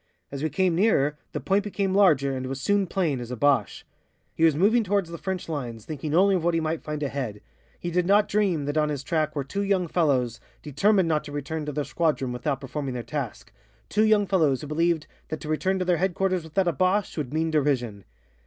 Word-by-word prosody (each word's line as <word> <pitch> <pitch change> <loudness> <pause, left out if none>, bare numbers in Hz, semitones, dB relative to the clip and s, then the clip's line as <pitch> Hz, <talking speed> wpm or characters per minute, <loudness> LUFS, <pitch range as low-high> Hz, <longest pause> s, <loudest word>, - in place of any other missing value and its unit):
As 140 -1 -5
we 155 - 0
came 180 +4 +1
nearer, 165 -6 +2 0.2
the - - -3
point 195 +1 +1
became 200 -2 -1
larger 150 -9 +4
and 130 0 -4
was 135 +1 -4
soon 200 +5 +1
plain, 165 -8 0
as 120 -1 -7
a 125 - -3
Boche. 145 +2 +1 0.5
He 165 - -1
was 160 -3 +5
moving 215 +8 +3
towards 195 -3 0
the 170 - -5
French 190 -2 -4
lines, 120 -8 -5
thinking 150 0 -3
only 195 +3 +5
of 180 -3 0
what 170 0 +2
he - - +2
might 160 0 -2
find 150 -1 -4
ahead. 130 -7 -3 0.4
He 175 - -4
did 175 +1 +1
not 205 +2 +4
dream 190 -8 +1
that 145 +2 0
on 150 0 +1
his 145 -2 -3
track 155 +1 -1
were 140 - -1
two 200 +9 -3
young 195 -3 +1
fellows 130 -9 +1 0.2
determined 185 +6 +2
not 155 -2 +1
to 145 - -8
return 150 +2 -4
to - - -1
the 145 0 -2
squadron 150 -6 0
without 125 +3 -2
performing 135 -1 -4
their 120 - -4
task, 120 -3 -5 0.4
two 215 - +2
young 215 -2 +4
fellows 160 -8 +2
who 150 - -7
believed 165 +1 +1 0.2
that 155 - -4
to - - -7
return 185 +5 0
to 180 -2 +1
headquarters 185 0 0
without 175 +4 0
a 170 - +2
Boche 185 +6 +1
would 145 -5 -4
mean 160 +1 0
derision. 130 -9 0
155 Hz, 225 wpm, -25 LUFS, 140-185 Hz, 0.5 s, was